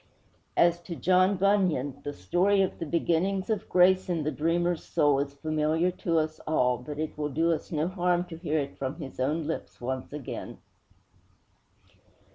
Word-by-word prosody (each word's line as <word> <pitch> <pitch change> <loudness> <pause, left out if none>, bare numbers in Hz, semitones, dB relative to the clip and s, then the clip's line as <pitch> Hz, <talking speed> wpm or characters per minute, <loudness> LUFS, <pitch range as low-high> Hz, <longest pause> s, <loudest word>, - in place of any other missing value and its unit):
As 170 0 +4
to 175 0 -7
John 185 +3 +3
Bunyan, 185 -9 +1
the 145 - -3
story 180 - +2
of 190 - -3
the 165 - -4
beginnings 185 +5 0
of 215 - -2
grace 185 +1 +4
in 165 -3 0
the 155 - -1
dreamer's 170 +2 0
soul 145 -2 +2
is 140 0 -3
familiar 155 +3 0
to 170 -2 -1
us 155 0 -1
all, 125 -6 +2
but 145 +4 -7
it 155 0 -3
will 150 0 -1
do 165 +4 +1
us 160 - -3
no 155 0 0
harm 180 -1 +1
to 175 -2 -9
hear 160 -2 -1
it 140 -2 -3
from 135 +1 -3
his 140 -6 -9
own 150 +5 0
lips 160 - -5
once 130 +1 -4
again. 145 -3 -6
165 Hz, 175 wpm, -28 LUFS, 150-180 Hz, -, As